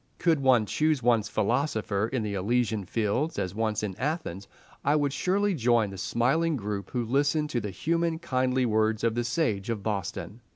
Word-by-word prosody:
Could 165 Hz, -3 st, +2 dB
one 130 Hz, -5 st, +4 dB
choose 150 Hz, +3 st, +1 dB
one's 115 Hz, -3 st, +3 dB
philosopher 110 Hz, -2 st, 0 dB
in 125 Hz, -2 st, -2 dB
the 105 Hz, -1 st, -3 dB
Elysian 110 Hz, +1 st, 0 dB
fields, 115 Hz, -, -1 dB
as 90 Hz, 0 st, -2 dB
once 110 Hz, 0 st, -1 dB
in 100 Hz, -3 st, -3 dB
Athens, 130 Hz, -, -3 dB, 0.4 s
I 145 Hz, +2 st, +3 dB
would 145 Hz, -2 st, +1 dB
surely 200 Hz, +5 st, +1 dB
join 120 Hz, -, +2 dB
the 95 Hz, -, -8 dB
smiling 145 Hz, -, +1 dB
group 100 Hz, -3 st, -4 dB
who 120 Hz, -2 st, -2 dB
listened 145 Hz, +5 st, +1 dB
to 120 Hz, -, 0 dB
the 105 Hz, -, -4 dB
human, 165 Hz, -, 0 dB
kindly 130 Hz, -5 st, 0 dB
words 110 Hz, -1 st, +1 dB
of 115 Hz, -1 st, +2 dB
the 120 Hz, +1 st, -1 dB
Sage 120 Hz, -5 st, -1 dB
of 110 Hz, -4 st, -2 dB
Boston. 105 Hz, +2 st, -4 dB
120 Hz, 180 wpm, -27 LUFS, 105-145 Hz, 0.4 s, one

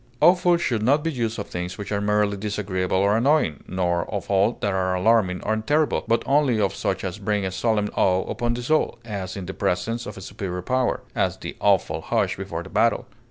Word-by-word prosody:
Awful 175 Hz, +1 st, +5 dB
should 120 Hz, -10 st, -1 dB
not 140 Hz, +7 st, +3 dB
be 165 Hz, -, 0 dB
used 115 Hz, -5 st, -2 dB
of 100 Hz, -, -4 dB
things 90 Hz, 0 st, -5 dB
which 105 Hz, -1 st, -6 dB
are 100 Hz, -1 st, 0 dB
merely 105 Hz, 0 st, +1 dB
disagreeable 95 Hz, -3 st, -2 dB
or 100 Hz, +2 st, +3 dB
annoying, 120 Hz, -, +2 dB
nor 90 Hz, -2 st, -1 dB
of 100 Hz, -1 st, -4 dB
all 100 Hz, +4 st, +3 dB
that 100 Hz, -4 st, 0 dB
are 95 Hz, -1 st, 0 dB
alarming 95 Hz, -2 st, +2 dB
and 110 Hz, 0 st, -1 dB
terrible, 150 Hz, 0 st, +2 dB
but 115 Hz, 0 st, +2 dB
only 135 Hz, -4 st, +3 dB
of 100 Hz, -2 st, +1 dB
such -, -, -2 dB
as 95 Hz, +2 st, -4 dB
bring 105 Hz, 0 st, -1 dB
a 95 Hz, -, -2 dB
solemn 105 Hz, +1 st, 0 dB
awe 95 Hz, 0 st, +2 dB
upon 120 Hz, 0 st, -1 dB
the 120 Hz, -, -5 dB
soul, 155 Hz, -1 st, +1 dB
as 100 Hz, -4 st, -5 dB
in 95 Hz, -, -5 dB
the 95 Hz, -, -5 dB
presence 100 Hz, +6 st, -1 dB
of 105 Hz, -, -8 dB
a -, -, -8 dB
superior 95 Hz, -2 st, -5 dB
power; 130 Hz, +2 st, 0 dB
as, -, -, 0 dB
the -, -, -7 dB
awful 100 Hz, -2 st, +2 dB
hush -, -, 0 dB
before -, -, -5 dB
the -, -, -11 dB
battle. -, -, +2 dB
105 Hz, 215 wpm, -24 LUFS, 95-120 Hz, -, Awful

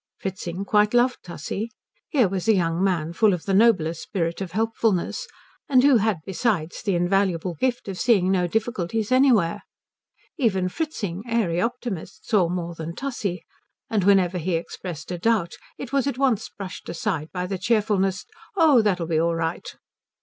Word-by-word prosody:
Fritzing 185 Hz, 0 st, -5 dB
quite 210 Hz, +2 st, +3 dB
loved 250 Hz, +1 st, +3 dB
Tussie. 180 Hz, +6 st, -5 dB, 0.4 s
Here 260 Hz, -, +3 dB
was 190 Hz, +1 st, -3 dB
a 220 Hz, -, +5 dB
young 170 Hz, -1 st, 0 dB
man 170 Hz, -4 st, 0 dB
full 205 Hz, +1 st, +3 dB
of 170 Hz, -, -9 dB
the 195 Hz, -, 0 dB
noblest 190 Hz, -7 st, +3 dB
spirit 170 Hz, -3 st, -3 dB
of 180 Hz, -3 st, -5 dB
helpfulness, 225 Hz, -, 0 dB, 0.4 s
and 255 Hz, -2 st, +5 dB
who 280 Hz, -3 st, +6 dB
had 210 Hz, -6 st, 0 dB
besides 190 Hz, -4 st, -1 dB
the 200 Hz, -3 st, 0 dB
invaluable 180 Hz, -1 st, +1 dB
gift 245 Hz, -, -1 dB
of 190 Hz, -2 st, -5 dB
seeing 200 Hz, -7 st, +3 dB
no 180 Hz, -2 st, +2 dB
difficulties 220 Hz, +1 st, -2 dB
anywhere. 250 Hz, -10 st, +3 dB, 0.8 s
Even 190 Hz, -8 st, +1 dB
Fritzing, 205 Hz, -, -4 dB
airy 205 Hz, -8 st, +1 dB
optimist, 230 Hz, -6 st, -4 dB
saw 200 Hz, -7 st, +3 dB
more 175 Hz, -1 st, -3 dB
than 165 Hz, 0 st, -6 dB
Tussie, 205 Hz, -11 st, -3 dB, 0.5 s
and 210 Hz, -4 st, +1 dB
whenever 185 Hz, -2 st, +3 dB
he 175 Hz, +1 st, -1 dB
expressed 170 Hz, 0 st, -6 dB
a 175 Hz, -, -4 dB
doubt 205 Hz, -4 st, +1 dB, 0.2 s
it 265 Hz, 0 st, -8 dB
was 275 Hz, -1 st, +2 dB
at 275 Hz, -3 st, -2 dB
once 260 Hz, -6 st, +1 dB
brushed 195 Hz, -2 st, -8 dB
aside 160 Hz, -2 st, -2 dB
by 180 Hz, -1 st, -3 dB
the 190 Hz, 0 st, -4 dB
cheerfullest 200 Hz, -2 st, +1 dB, 0.3 s
"Oh, 315 Hz, -, +6 dB
that'll 185 Hz, -5 st, 0 dB
be 160 Hz, -1 st, 0 dB
all 170 Hz, +1 st, +1 dB
right." 165 Hz, 0 st, -3 dB
195 Hz, 165 wpm, -24 LUFS, 175-225 Hz, 0.8 s, who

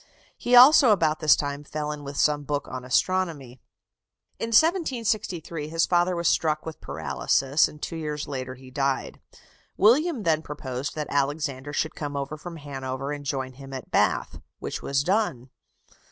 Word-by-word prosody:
He 245 Hz, -, +1 dB
also 260 Hz, +1 st, +9 dB
about 160 Hz, -7 st, +3 dB
this 155 Hz, -2 st, +6 dB
time 145 Hz, 0 st, -4 dB
fell 150 Hz, 0 st, -4 dB
in 150 Hz, -1 st, -7 dB
with 140 Hz, 0 st, -7 dB
some 150 Hz, -1 st, +2 dB
book 145 Hz, -1 st, -3 dB
on 130 Hz, -1 st, -6 dB
astronomy. 140 Hz, -3 st, -1 dB, 0.8 s
In 230 Hz, -, -2 dB
1763 225 Hz, -, +1 dB
his 165 Hz, +1 st, +1 dB
father 175 Hz, 0 st, +2 dB
was 170 Hz, -1 st, 0 dB
struck 155 Hz, -1 st, +1 dB
with 160 Hz, -1 st, -8 dB
paralysis, 80 Hz, -, +1 dB
and 150 Hz, -, -13 dB
two 165 Hz, -, -5 dB
years 150 Hz, -2 st, -4 dB
later 130 Hz, -2 st, -5 dB
he 130 Hz, 0 st, -14 dB
died. 135 Hz, 0 st, -2 dB, 0.6 s
William 255 Hz, -, +3 dB
then 160 Hz, -3 st, +2 dB
proposed 135 Hz, -3 st, -5 dB
that 150 Hz, -1 st, -2 dB
Alexander 145 Hz, -1 st, -1 dB
should 155 Hz, +2 st, -1 dB
come 145 Hz, -2 st, -5 dB
over 140 Hz, +2 st, -4 dB
from 170 Hz, +3 st, -9 dB
Hanover 135 Hz, -2 st, -5 dB
and 145 Hz, -1 st, -5 dB
join 130 Hz, -2 st, -3 dB
him 135 Hz, +1 st, -11 dB
at 130 Hz, -2 st, -8 dB
Bath, -, -, +1 dB, 0.2 s
which -, -, -5 dB
was 140 Hz, 0 st, 0 dB
done. 175 Hz, -, -1 dB
150 Hz, 165 wpm, -25 LUFS, 135-170 Hz, 0.8 s, also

